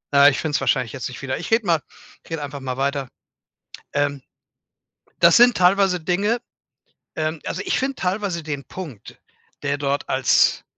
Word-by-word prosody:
Ah, 140 +1 +8
ich 145 - -2
find's 150 -3 -1
wahrscheinlich 125 -2 +1
jetzt 130 - -4
nicht 125 - -10
wieder. 130 -1 -2
Ich 175 - -6
rede 225 -1 +2
mal 165 -4 +2 0.4
ich - - -19
rede 165 -3 -4
einfach 145 0 -6
mal 130 -1 -4
weiter. 140 0 -1 0.9
Ähm, 145 -1 0 1.0
das 170 -1 +7
sind 240 0 +6
teilweise 185 0 +3
Dinge 200 +8 0 0.8
ähm, 155 0 -2
also, 185 - -4
ich - - +1
find 265 0 -2
teilweise 185 -2 -2
den 145 -3 -4
Punkt, 155 - -9 0.4
der 145 0 -1
dort 140 0 -1
als 130 -1 +3
155 Hz, 165 wpm, -22 LUFS, 140-185 Hz, 1.0 s, Ah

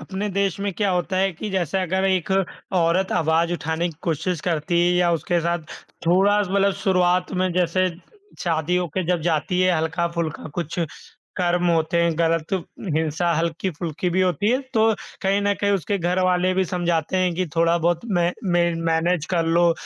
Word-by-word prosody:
अपने 195 +2 -4
देश 195 0 0
में 200 0 -1
क्या 205 0 0
होता 180 +1 -1
है 190 +1 +2
कि 210 +5 -6
जैसे 190 -1 -1
अगर 190 +1 0
एक 190 -2 +1 0.4
औरत 180 +1 +2
आवाज़ 165 +2 +2
उठाने 165 0 -1
की 165 - -10
कोशिश 165 +1 -1
करती 170 +1 0
है 175 - +3
या 175 -1 +3
उसके 170 +1 0
साथ 170 +1 0 0.5
थोड़ा-सा 195 +2 +3
मतलब 200 0 +3
शुरुआत 180 -2 +2
में 185 -1 0
जैसे 180 +1 +1 0.5
शादी 165 0 0
होके 180 +1 -1
जब 175 -1 +1
जाती 170 +2 0
है, 185 -2 +3
हल्का-फुल्का 165 0 -2
कुछ 170 -1 -4 0.6
कर्म 175 -1 +1
होते 165 0 +1
हैं 170 0 +2
गलत 165 0 0 0.4
हिंसा 160 +2 0
हल्की-फुल्की 170 +1 -2
भी 185 +2 +1
होती 185 +2 +1
है, 255 - +3 0.2
तो 220 0 +4 0.3
कहीं 195 +1 +2
न 205 0 +2
कहीं 205 - +2
उसके 200 +1 -1
घरवाले 180 +1 +1
भी 190 0 +2
समझाते 175 -1 -1
हैं 185 -1 +2
कि 185 +1 -1
थोड़ा-बहुत 170 0 +2
मै, 175 -2 +2
मै 175 -2 +2
मैनेज 165 0 0
कर 165 - +2
लो, 170 +1 +4
175 Hz, 170 wpm, -22 LUFS, 165-185 Hz, 0.6 s, तो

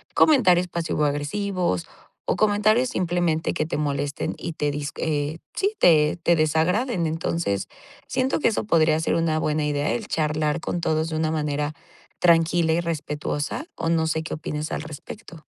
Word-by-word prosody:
comentarios 185 - +5
pasivo-agresivos, 165 - -1 0.4
o - - +1
comentarios 215 +4 +3
simplemente 175 -5 0
que 155 - -1
te 165 - -3
molesten 145 -1 -2
y 170 - -5
te 150 -1 -1
dis 145 0 -4
eh, 150 0 -1 0.2
sí, 400 +2 0
te 155 -3 +5
te 170 - +4
desagraden. 170 - +1
Entonces, 155 - -1 0.4
siento 260 +3 0
que - - +3
eso 220 - -2
podría 160 -5 +3
ser 160 - 0
una 165 -1 +1
buena 155 -1 0
idea, 145 0 0
el 225 -3 -3
charlar 150 0 0
con 175 - -2
todos 160 0 0
de 160 - -3
una 155 0 0
manera 150 -1 -1 0.5
tranquila 165 -1 +3
y 170 - +1
respetuosa. 150 - -3
O 165 - -2
no 165 -1 +2
sé 160 0 0
qué 160 - -4
opines 155 0 -4
al - - -3
respecto. 160 +2 -10
160 Hz, 160 wpm, -24 LUFS, 150-175 Hz, 0.5 s, comentarios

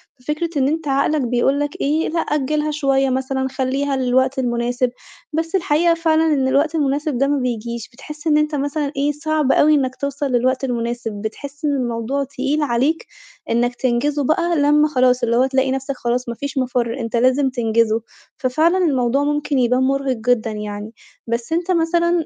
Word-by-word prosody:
ففكرة 300 +6 -3
إن 265 - +2
أنتَ 315 +1 -2
عقلك 280 +2 +1
بيقول 250 +3 +1
لك 290 0 -3
إيه، 305 +3 +1
لأ 330 +1 -1
أجّلها 300 +1 0
شوية 275 -2 +1
مثلًا، 265 0 -1
خلِّيها 270 +1 -1
للوقت 260 +1 +1
المناسب، 245 +1 0 0.4
بس 325 +4 -1
الحقيقة 340 -1 +3
فعلًا 325 -1 +2
إن 265 -2 +1
الوقت 295 +4 +1
المناسب 290 -1 0
ده 275 +3 +2
ما 285 0 +1
بييجيش، 235 -2 -3
بتحس 300 +5 -9
إن 300 -1 +4
أنتَ 300 0 +1
مثلًا 285 +1 -2
إيه، 285 +1 +2
صعب 300 -1 0
أوي 305 +1 +5
إنَّك 260 -3 0
توصل 280 0 -3
للوقت 255 +2 +1
المناسب، 235 -2 -2
بتحس 280 +7 -6
إن 295 - +2
الموضوع 250 0 -1
تقيل 275 +3 -2
عليك 280 +4 0 0.4
إنَّك 245 +1 +1
تنجزه 280 +4 0
بقى، 340 +5 +1
لمّا 295 0 +4
خلاص 255 -3 +2
اللي 235 0 +2
هو 255 - +4
تلاقي 265 0 +1
نفسَك 270 +1 -3
خلاص 245 0 -2
ما 235 - -4
فيش 280 +2 -5
مفر، 250 -1 -1
أنتَ 230 -1 -3
لازِم 255 +3 +3
تنجِزه. 230 -2 +1 0.4
ففعلًا 310 +6 +2
الموضوع 275 -6 +1
ممكن 295 -1 0
يبان 250 +1 +2
مُرهق 270 0 0
جدًا 225 -1 +1
يعني. 210 +1 -6 0.3
بس 235 +6 -2
أنتَ 345 +2 0
مثلًا، 340 0 +2
270 Hz, 175 wpm, -20 LUFS, 245-300 Hz, 0.4 s, أوي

